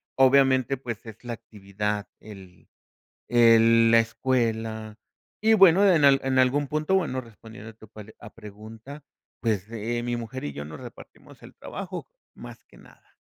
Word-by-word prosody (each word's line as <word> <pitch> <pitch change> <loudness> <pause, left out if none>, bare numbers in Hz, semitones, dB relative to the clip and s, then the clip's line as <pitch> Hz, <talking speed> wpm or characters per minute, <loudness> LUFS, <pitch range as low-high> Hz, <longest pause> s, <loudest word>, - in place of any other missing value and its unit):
obviamente, 135 0 +3
pues 120 -4 -8
es 110 -1 -12
la 120 - -4
actividad, 105 -1 -5
el 95 -4 -15 0.6
el 115 -1 +5
la 115 - +6
escuela 110 -2 -3 0.4
y 220 +1 +3
bueno, 195 0 +6
en 165 -6 +3
al 140 -1 +6
en 130 -1 +2
algún 140 +3 +1
punto, 155 +6 -1
bueno, 150 -9 -2
respondiendo 110 -2 -13
a - - -18
tu 110 0 -17
pal 110 +1 -13
a - - -12
pregunta, 110 +6 -12 0.3
pues, 110 -3 -2
eh, 115 +1 -4
mi 120 0 -3
mujer 120 +2 -7
y 70 - -5
yo 70 - -7
nos 75 0 -10
repartimos - - -14
el - - -14
trabajo, 190 -2 -8 0.3
más - - -12
que - - -22
nada. - - -21
115 Hz, 160 wpm, -25 LUFS, 110-135 Hz, 0.6 s, la